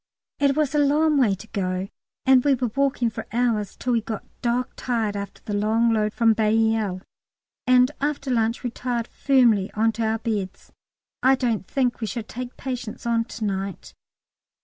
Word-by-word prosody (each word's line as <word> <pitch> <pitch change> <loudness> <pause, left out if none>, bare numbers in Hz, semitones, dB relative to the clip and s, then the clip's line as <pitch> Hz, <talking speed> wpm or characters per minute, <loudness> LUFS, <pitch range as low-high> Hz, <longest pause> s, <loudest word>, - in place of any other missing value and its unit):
It 280 0 +2
was 300 -2 +1
a 295 - +2
long 295 +1 +3
way 215 -7 +3
to 205 +3 -12
go, 185 -1 -2 0.4
and 260 -1 +6
we 285 -2 +4
were 245 -2 -2
walking 275 -4 +1
for - - -7
hours 225 -4 0
till 250 - -1
we 230 - +2
got 220 -1 -5 0.2
dog 245 +1 -1
tired 225 -4 -1
after 200 0 -6
the 210 - -5
long 220 +3 +2
load 215 -1 +1
from 225 0 +3
Bailleul, 220 -3 +1 0.6
and 255 +1 +5
after 285 -2 -1
lunch 230 0 0
retired 240 -1 -2
firmly 235 -8 +3
on 225 +1 +3
to 225 +1 -3
our 220 0 +1
beds. 210 -4 -4 0.5
I 265 +1 +5
don't 235 -7 -1
think 250 -3 0
we 220 - -1
shall 220 +4 -4
take 245 +3 -7
patients 245 -4 -5
on 230 -1 +1
to 225 -2 -5
night. 195 -2 -4
230 Hz, 175 wpm, -24 LUFS, 215-255 Hz, 0.6 s, and